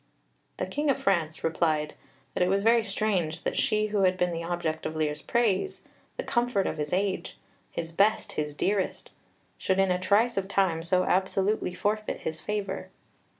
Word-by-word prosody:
The -, -, -1 dB
King 295 Hz, 0 st, -1 dB
of 275 Hz, -, +2 dB
France 170 Hz, -5 st, 0 dB
replied 155 Hz, -2 st, +1 dB, 0.4 s
that -, -, -2 dB
it 180 Hz, -, +3 dB
was 195 Hz, +1 st, +2 dB
very 230 Hz, +1 st, +5 dB
strange 195 Hz, -6 st, -1 dB
that -, -, -1 dB
she 215 Hz, 0 st, +1 dB
who 205 Hz, -, +2 dB
had 185 Hz, -1 st, +3 dB
been 180 Hz, -1 st, +1 dB
the 165 Hz, 0 st, -3 dB
object 165 Hz, -2 st, -2 dB
of 160 Hz, -, -6 dB
Lear's 150 Hz, -1 st, -1 dB
praise, 235 Hz, -, 0 dB, 0.3 s
the -, -, -2 dB
comfort 240 Hz, -, +1 dB
of -, -, -2 dB
his 150 Hz, 0 st, -2 dB
age 190 Hz, +1 st, -1 dB, 0.3 s
his 165 Hz, -1 st, -5 dB
best, 205 Hz, +6 st, +2 dB
his 150 Hz, -1 st, -3 dB
dearest 195 Hz, +4 st, -1 dB, 0.5 s
should 190 Hz, -, +1 dB
in 195 Hz, -1 st, +3 dB
a 180 Hz, -, +1 dB
trice 210 Hz, +5 st, +2 dB
of 195 Hz, -1 st, 0 dB
time 190 Hz, -5 st, +1 dB
so 180 Hz, +2 st, +2 dB
absolutely 190 Hz, +1 st, +1 dB
forfeit 215 Hz, +2 st, -1 dB
his 160 Hz, 0 st, -4 dB
favour. 210 Hz, -1 st, -3 dB
190 Hz, 180 wpm, -28 LUFS, 165-210 Hz, 0.5 s, very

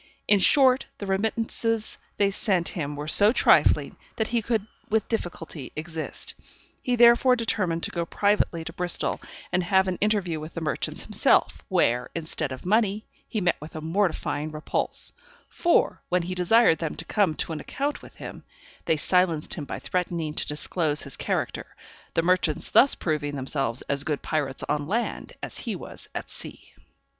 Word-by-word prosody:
In 205 Hz, -, +5 dB
short, 260 Hz, +4 st, +4 dB
the 200 Hz, -, -6 dB
remittances 225 Hz, +2 st, 0 dB, 0.2 s
they 200 Hz, -1 st, +3 dB
sent 190 Hz, -4 st, +1 dB
him 150 Hz, -4 st, -4 dB
were 145 Hz, +1 st, -5 dB
so 205 Hz, +7 st, +5 dB
trifling, -, -, +4 dB, 0.2 s
that 220 Hz, -, -1 dB
he 235 Hz, -1 st, +1 dB
could 220 Hz, -2 st, -1 dB, 0.2 s
with 220 Hz, -1 st, +1 dB
difficulty 165 Hz, -, -4 dB
exist. 160 Hz, 0 st, -4 dB, 0.5 s
He 250 Hz, -, 0 dB
therefore 240 Hz, +2 st, +6 dB
determined 185 Hz, -8 st, 0 dB
to -, -, -2 dB
go 170 Hz, -1 st, -2 dB
privately 200 Hz, -5 st, +1 dB
to 165 Hz, -, -7 dB
Bristol, 180 Hz, -1 st, -2 dB, 0.3 s
and 180 Hz, 0 st, +2 dB
have 190 Hz, +1 st, +3 dB
an 185 Hz, -1 st, -2 dB
interview 200 Hz, -6 st, +1 dB
with 155 Hz, +2 st, -9 dB
the 165 Hz, -, -3 dB
merchants 155 Hz, -, -2 dB
himself, -, -, +3 dB
where, 120 Hz, +1 st, +2 dB
instead 160 Hz, -3 st, -2 dB
of 130 Hz, -, -7 dB
money, 210 Hz, +1 st, +2 dB, 0.2 s
he 215 Hz, -, -2 dB
met 180 Hz, -, +2 dB
with 155 Hz, +2 st, -10 dB
a -, -, -3 dB
mortifying 160 Hz, -3 st, -1 dB
repulse; 155 Hz, 0 st, -2 dB, 0.3 s
for, 345 Hz, -, +2 dB
when 180 Hz, -1 st, +2 dB
he 180 Hz, +2 st, -3 dB
desired 180 Hz, 0 st, +4 dB
them 165 Hz, -2 st, -3 dB
to -, -, -6 dB
come 195 Hz, -7 st, +1 dB
to -, -, -2 dB
an 155 Hz, -, -4 dB
account 285 Hz, -, -3 dB
with -, -, -14 dB
him, -, -, -9 dB, 0.4 s
they 160 Hz, -, +2 dB
silenced 170 Hz, -2 st, +1 dB
him 150 Hz, -, -5 dB
by -, -, -5 dB
threatening 170 Hz, -4 st, -2 dB
to -, -, -2 dB
disclose 150 Hz, 0 st, +1 dB
his 140 Hz, -, -5 dB
character; -, -, -3 dB, 0.4 s
the 165 Hz, -, +3 dB
merchants 175 Hz, -4 st, +1 dB
thus 275 Hz, -, +6 dB
proving 150 Hz, -3 st, -2 dB
themselves 135 Hz, -2 st, -1 dB
as 140 Hz, 0 st, -1 dB
good 150 Hz, -1 st, -2 dB
pirates 145 Hz, -4 st, -1 dB
on 145 Hz, -1 st, -1 dB
land 230 Hz, +6 st, -2 dB
as -, -, -3 dB
he 225 Hz, -5 st, -3 dB
was -, -, -9 dB
at -, -, -4 dB
sea. -, -, -9 dB
175 Hz, 170 wpm, -26 LUFS, 155-210 Hz, 0.5 s, therefore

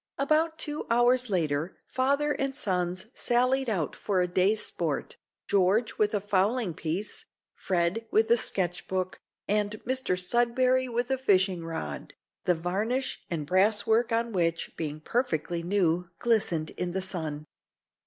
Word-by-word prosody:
About 310 Hz, +3 st, +1 dB
two 300 Hz, -1 st, -3 dB
hours 240 Hz, +1 st, +3 dB
later, 160 Hz, -3 st, -1 dB
father 280 Hz, +3 st, +1 dB
and 275 Hz, -2 st, -2 dB
sons 185 Hz, -6 st, -1 dB
sallied 255 Hz, +2 st, +1 dB
out 175 Hz, -9 st, -1 dB
for 195 Hz, -3 st, -1 dB
a 180 Hz, -, +2 dB
day's 190 Hz, +4 st, +2 dB
sport, -, -, -3 dB, 0.3 s
George 205 Hz, +4 st, +2 dB
with 210 Hz, 0 st, +2 dB
a -, -, +2 dB
fowling 205 Hz, +1 st, +1 dB
piece, 175 Hz, +5 st, -4 dB, 0.3 s
Fred 185 Hz, +5 st, -1 dB
with 220 Hz, +1 st, +2 dB
a -, -, +8 dB
sketch 180 Hz, -4 st, 0 dB
book, 185 Hz, -1 st, -2 dB, 0.3 s
and 210 Hz, 0 st, +1 dB
Mr 260 Hz, -7 st, 0 dB
Sudberry 245 Hz, +6 st, +2 dB
with 240 Hz, +2 st, -1 dB
a 265 Hz, -, +1 dB
fishing 190 Hz, -7 st, +2 dB
rod, 75 Hz, -, -6 dB, 0.3 s
the 180 Hz, -, +3 dB
varnish 205 Hz, +10 st, -1 dB
and 160 Hz, -4 st, -3 dB
brass 200 Hz, +6 st, +3 dB
work 225 Hz, +2 st, +2 dB
on 230 Hz, +1 st, 0 dB
which, 170 Hz, -4 st, -1 dB
being 155 Hz, -1 st, -4 dB
perfectly 170 Hz, -, -1 dB
new, 175 Hz, -1 st, +1 dB
glistened 180 Hz, -9 st, +1 dB
in 180 Hz, -1 st, -4 dB
the 190 Hz, 0 st, -1 dB
sun. 155 Hz, -5 st, -3 dB
200 Hz, 145 wpm, -28 LUFS, 175-240 Hz, 0.3 s, a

